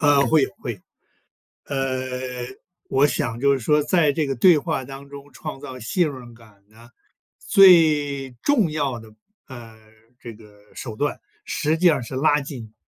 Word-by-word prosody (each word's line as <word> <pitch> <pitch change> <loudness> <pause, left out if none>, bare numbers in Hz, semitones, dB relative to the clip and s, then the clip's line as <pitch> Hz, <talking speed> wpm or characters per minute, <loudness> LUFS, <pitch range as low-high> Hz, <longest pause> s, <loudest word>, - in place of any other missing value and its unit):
呃， 145 -2 +4
会 155 -3 +3
有 - - -2
会 120 - -4
有。 100 - -16 0.9
呃， 130 -2 -4 0.4
我 135 +2 +3
想 115 -4 -3
就 140 +2 +3
是 135 - 0
说 150 +5 +2
在 150 0 +2
这 155 +1 -1
个 135 - -2
对 170 +6 +5
话 135 -2 -3
当 135 +1 -11
中 140 0 -12
创 150 -3 -8
造 130 -3 -9
信 155 - 0
任 125 -3 -11
感 105 -4 -21
呢， 115 +2 -18 0.5
最 150 -8 +4
重 225 - +2
要 140 -5 -2
的， 110 -1 -15 0.3
呃， 120 -4 -11 0.4
这 120 - -9
个 105 -1 -19
手 115 -4 -7
段 145 +5 -2 0.2
实 155 0 -1
际 180 +3 +1
上 155 -7 +4
是 120 - -8
拉 145 +1 +2
近 125 -6 -9
135 Hz, 180 characters per minute, -22 LUFS, 120-150 Hz, 0.9 s, 对